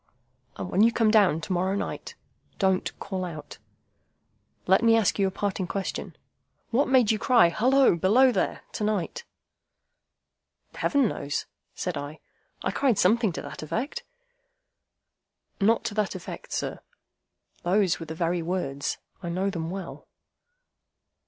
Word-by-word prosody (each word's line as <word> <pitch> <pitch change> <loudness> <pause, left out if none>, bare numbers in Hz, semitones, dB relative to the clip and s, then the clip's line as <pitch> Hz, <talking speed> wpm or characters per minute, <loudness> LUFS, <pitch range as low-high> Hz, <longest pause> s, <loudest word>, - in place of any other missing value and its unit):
"And 180 - -6
when 195 - +3
you 230 +2 +6
come 225 -2 +3
down 200 -7 +4
to 185 - -3
morrow 185 +2 0
night, - - -5 0.4
don't 190 -2 +1
call 190 -2 -4
out! 165 -4 -7 1.1
Let 190 +3 +4
me 230 -1 +5
ask 215 -2 +1
you 195 - +3
a - - 0
parting 190 -1 -2
question. 195 0 -4 0.6
What 265 +5 +2
made 255 -5 +4
you 215 - 0
cry, 240 -10 +5
'Halloa! 255 +1 +4
Below 235 +10 +5
there!' - - -1
to - - -4
night?" 210 - -2 1.5
"Heaven 280 -4 +2
knows," 145 -7 -3 0.3
said 180 -4 -3
I. 145 +2 -6 0.4
"I - - 0
cried 260 -7 +1
something 215 +2 +3
to - - -5
that - - -8
effect—" 245 - -3 1.6
"Not 220 +3 +3
to - - -3
that 210 -2 -1
effect, 180 - -8
sir. - - -3 0.8
Those 185 0 +2
were 165 - -7
the 160 - -6
very 170 +1 0
words. 160 -5 -2 0.2
I 175 - -4
know 190 +3 -1
them 165 -3 -4
well." 190 -1 -7
195 Hz, 145 wpm, -26 LUFS, 175-225 Hz, 1.6 s, you